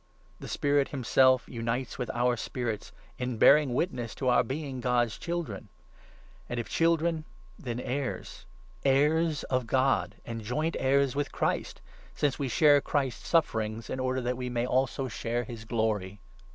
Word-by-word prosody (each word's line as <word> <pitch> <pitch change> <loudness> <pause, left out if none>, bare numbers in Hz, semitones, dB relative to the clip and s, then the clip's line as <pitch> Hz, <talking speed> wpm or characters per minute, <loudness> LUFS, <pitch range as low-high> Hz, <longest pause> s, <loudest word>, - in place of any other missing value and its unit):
The - - -8
Spirit 145 -1 +1
himself 130 -1 +3
16 - - -13
unites 115 +2 -2
with 125 - -3
our 120 +1 +1
spirits 115 -2 -4 0.3
in 125 -2 -2
bearing 140 0 +6
witness 125 -8 -2
to 130 - 0
our 125 - +5
being 135 +1 -4
God's 120 -2 +1
children, 170 - -4 0.8
and 120 - -2
if 115 - -4
children, 165 -1 +1 0.4
then 120 -3 -4
heirs 130 +2 -4 0.2
— - - -26
heirs 150 +3 +2
of 130 -2 -1
God, 130 +2 +1
and 115 -1 -5
joint 150 +10 -1
17 - - -4
heirs 140 -2 +3
with 145 0 -1
Christ, - - -2 0.3
since 140 -3 0
we 140 - -1
share 145 +3 +5
Christ's 135 -5 -2
sufferings 110 -9 0
in 130 - -3
order 130 0 0
that 125 0 -2
we 125 -1 -3
may 120 -1 -1
also 130 +1 0
share 120 0 -2
his 115 -1 -9
Glory. 105 -4 -1
130 Hz, 165 wpm, -29 LUFS, 120-140 Hz, 0.8 s, bearing